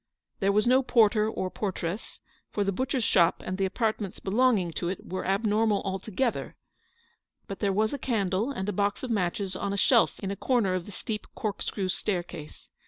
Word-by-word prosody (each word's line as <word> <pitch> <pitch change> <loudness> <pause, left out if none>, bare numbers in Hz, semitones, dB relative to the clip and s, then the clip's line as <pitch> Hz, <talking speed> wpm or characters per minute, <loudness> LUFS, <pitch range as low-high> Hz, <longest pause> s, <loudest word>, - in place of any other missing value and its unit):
There 195 0 +3
was 210 +1 +3
no 255 +2 +5
porter 220 -4 +4
or 185 -4 -3
portress, 190 0 -4 0.3
for 205 - 0
the 195 - 0
butcher's 255 +4 -1
shop 170 -5 +3
and 185 +1 -3
the 195 - +2
apart 220 +3 0
ments 195 -3 -5
belonging 210 -4 +2
to 170 +2 -3
it 185 - -5
were 185 0 -4
abnormal 210 +1 +2
altogether; 195 +5 -2 0.9
but 195 - -7
there 200 -2 +1
was 215 +4 +1
a 285 - -3
candle 210 -1 0
and 210 -6 -3
box 205 +3 0
of 255 - -3
matches 190 -1 -1
on 200 +1 -2
a - - -2
shelf 235 +3 +4
in 195 -1 -3
a - - -2
corner 230 -5 +1
of 180 -2 -2
the - - -8
steep 210 +2 -5
corkscrew 205 -2 -2
staircase. 175 -5 -4
200 Hz, 185 wpm, -28 LUFS, 190-220 Hz, 0.9 s, no